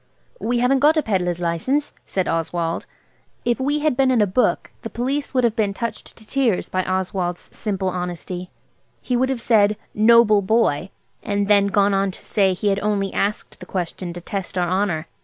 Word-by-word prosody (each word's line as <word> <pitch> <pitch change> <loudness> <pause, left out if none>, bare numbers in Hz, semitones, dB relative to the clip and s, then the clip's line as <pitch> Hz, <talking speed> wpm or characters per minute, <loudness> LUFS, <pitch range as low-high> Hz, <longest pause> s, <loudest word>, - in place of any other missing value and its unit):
"We 240 +1 0
haven't 250 +3 +3
got 300 +3 +4
a 310 - +2
pedlar's 180 -4 0
license," 180 - -1
said 185 -2 -1
Oswald. 165 0 -2 0.6
If 240 +1 +1
we 290 +3 0
had 305 -4 +2
been 265 0 +3
in 255 -2 +3
a 210 - +5
book 200 +6 0
the - - -6
Police 275 +4 -2
would 255 - +3
have 230 -2 +2
been 205 -3 0
touched 230 -1 -5
to 220 - -12
tears 240 -5 0
by 185 0 0
Oswald's 185 -1 -3
simply 195 -3 -2
honesty. 180 0 -5 0.5
He 250 - -2
would 260 +2 +2
have 265 -3 -1
said 210 -3 +3 0.2
"Noble 215 -1 +5
boy!" 195 -5 +1 0.3
and 200 -1 -1
then 200 -1 +5
gone 200 0 +2
on 195 0 +1
to 185 - -9
say 195 -3 +2
he 205 +3 0
had 195 0 +1
only 200 -1 -1
asked 205 +1 -2
the - - -11
question 180 -1 -4
to 175 - -8
test 190 +1 -5
our 175 -1 +1
honour. 180 -3 0
200 Hz, 195 wpm, -21 LUFS, 185-235 Hz, 0.6 s, a